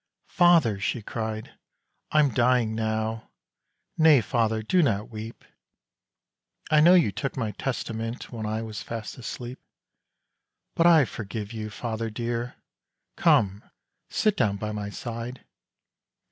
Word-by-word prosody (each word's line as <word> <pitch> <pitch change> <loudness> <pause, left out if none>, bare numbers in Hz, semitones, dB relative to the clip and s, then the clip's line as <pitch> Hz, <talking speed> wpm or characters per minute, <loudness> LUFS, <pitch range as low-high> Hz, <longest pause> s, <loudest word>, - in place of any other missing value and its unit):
"Father," 170 - +4
she 110 +3 -2
cried, 110 0 -5 0.5
"I'm 150 -5 +3
dying 120 -2 +2
now; 110 0 -2 0.7
Nay, 155 -3 +7
father! 110 0 0
do 180 - +3
not 110 -8 0
weep! 110 +1 -8 1.3
I 155 - +6
know 170 +4 +7
you 165 - +4
took 135 +7 -4
my 115 -4 -1
Testament 115 -1 -4
When 110 -3 -4
I 110 +1 -2
was 110 -4 -6
fast 115 +3 -6
asleep. 120 +1 -7 1.1
"But 170 - +4
I 160 -5 +7
forgive 105 -1 -6
you, 110 -1 -5
father 115 +1 -4
dear! 120 +2 -3 0.6
Come! 100 -1 +3 0.5
sit 215 -2 +1
down 100 - +1
by 105 +1 -4
my 105 -1 -4
side! 120 +3 -6
115 Hz, 125 wpm, -26 LUFS, 110-125 Hz, 1.3 s, Nay